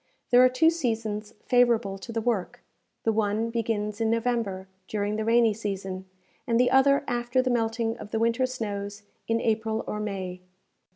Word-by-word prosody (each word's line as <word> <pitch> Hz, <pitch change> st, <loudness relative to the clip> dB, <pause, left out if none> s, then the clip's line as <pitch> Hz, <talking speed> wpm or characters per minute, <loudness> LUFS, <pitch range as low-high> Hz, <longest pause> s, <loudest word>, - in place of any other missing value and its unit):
There 250 Hz, +1 st, +7 dB
are 255 Hz, -, +7 dB
two 320 Hz, +6 st, +4 dB
seasons 225 Hz, -8 st, -3 dB
favorable 235 Hz, -5 st, +3 dB
to 230 Hz, -, -8 dB
the 225 Hz, 0 st, -2 dB
work; 220 Hz, -5 st, -2 dB, 0.4 s
the 225 Hz, -, +2 dB
one 215 Hz, +1 st, 0 dB
begins 220 Hz, -2 st, -2 dB
in 225 Hz, -, +2 dB
November, 230 Hz, -5 st, -1 dB, 0.2 s
during 205 Hz, 0 st, -1 dB
the 220 Hz, -, -1 dB
rainy 230 Hz, 0 st, +4 dB
season, 195 Hz, -3 st, -4 dB, 0.4 s
and 230 Hz, 0 st, +2 dB
the 250 Hz, -, +4 dB
other 275 Hz, +1 st, +5 dB
after 240 Hz, +1 st, 0 dB
the 255 Hz, 0 st, +2 dB
melting 225 Hz, 0 st, 0 dB
of 210 Hz, -, -8 dB
the 220 Hz, -, -2 dB
winter 230 Hz, +3 st, +2 dB
snows 205 Hz, -4 st, -5 dB, 0.2 s
in 230 Hz, 0 st, +1 dB
April 220 Hz, 0 st, 0 dB
or 210 Hz, -, -4 dB
May. 190 Hz, -3 st, -4 dB
225 Hz, 170 wpm, -27 LUFS, 205-240 Hz, 0.4 s, There